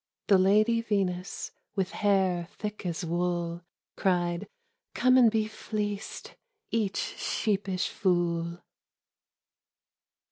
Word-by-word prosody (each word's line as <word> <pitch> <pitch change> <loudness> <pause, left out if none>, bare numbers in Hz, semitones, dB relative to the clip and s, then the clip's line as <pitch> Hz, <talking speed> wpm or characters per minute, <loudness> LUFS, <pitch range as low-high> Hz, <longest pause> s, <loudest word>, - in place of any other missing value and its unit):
The 195 -2 +7
lady 215 +5 +4
Venus, 195 -5 -2 0.2
with 190 -3 0
hair 190 -4 +2
thick 210 -3 -5
as 170 +1 -3
wool. 175 0 -1 0.3
Cried, 175 -2 0 0.5
"Come 255 0 +4
and 245 -3 +7
be 220 -1 +1
fleeced,— 210 -1 -4 0.4
each 215 -4 0 0.2
sheepish 195 -3 0
fool!" 170 -2 0
190 Hz, 95 wpm, -29 LUFS, 175-210 Hz, 0.5 s, The